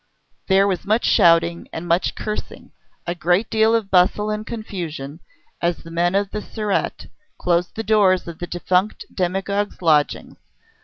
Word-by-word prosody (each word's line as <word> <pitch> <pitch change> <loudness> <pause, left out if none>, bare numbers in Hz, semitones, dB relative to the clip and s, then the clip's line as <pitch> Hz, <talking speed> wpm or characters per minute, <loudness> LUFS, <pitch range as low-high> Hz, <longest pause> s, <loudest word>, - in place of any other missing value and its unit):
There 195 0 +4
was 190 -3 -1
much 215 +4 +1
shouting 170 0 +3
and 160 +2 -6
much 170 +2 +1
cursing, 215 0 -6 0.3
a 175 - -2
great 175 +4 0
deal 220 +1 +3
of 215 -4 -2
bustle 190 +3 +3
and 215 0 -4
confusion, 170 -10 -6 0.4
as 170 0 -1
the 165 - -11
men 175 +2 +1
of 200 0 0
the 210 - -4
Surete 210 -1 -3 0.3
closed 175 0 0
the 225 - -3
doors 200 -4 +3
of 170 -2 -8
the 175 - -5
defunct 180 +4 0
demagogue's 195 +2 -2
lodgings. 150 -5 +1
185 Hz, 155 wpm, -21 LUFS, 170-210 Hz, 0.4 s, There